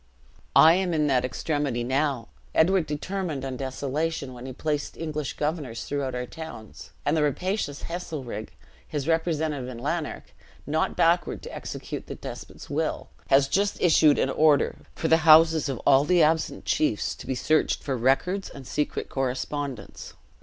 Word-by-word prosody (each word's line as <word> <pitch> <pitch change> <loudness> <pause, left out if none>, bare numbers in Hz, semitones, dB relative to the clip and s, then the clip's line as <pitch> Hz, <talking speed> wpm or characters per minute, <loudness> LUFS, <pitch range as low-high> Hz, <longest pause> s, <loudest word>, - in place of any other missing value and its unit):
I 160 +1 +8
am 180 -2 0
in 150 -1 +2
that 130 -4 +2
extremity 135 -1 -1
now. 130 -1 0 0.3
Edward 175 0 +3
determined 155 -2 -3
on 130 -1 -4
desolation, 140 +2 -3
when 125 +1 -9
he - - -5
placed 150 +2 -3
English 155 -3 -3
governors 145 -7 -3
throughout 140 -3 -3
our 125 0 -3
towns; 140 -7 -10 0.2
and 145 - +2
the 155 - +2
rapacious 150 +1 -1
Heselrigge, 155 - -5 0.4
his 145 -2 -3
representative 160 -5 0
in 125 - -7
Lanark, 150 +5 -4 0.3
not 155 +2 0
backward 170 +1 +2
to - - -8
execute - - -6
the - - -6
despot's - - -9
will, - - -2 0.2
has 135 0 +5
just 200 +7 0
issued 155 -4 +5
an 135 - +1
order, 150 -2 +3 0.2
for 160 - -1
the 160 - +5
houses 160 -1 +6
of 135 - -2
all 135 0 +6
the 175 +2 +4
absent 160 +1 +1
chiefs 130 -9 +1
to - - -11
be 130 - -1
searched 155 +5 +1
for 135 - -1
records 135 +11 +1
and 135 -2 -11
secret 150 +3 -2
correspondence. 135 -2 -4
150 Hz, 160 wpm, -26 LUFS, 135-160 Hz, 0.4 s, I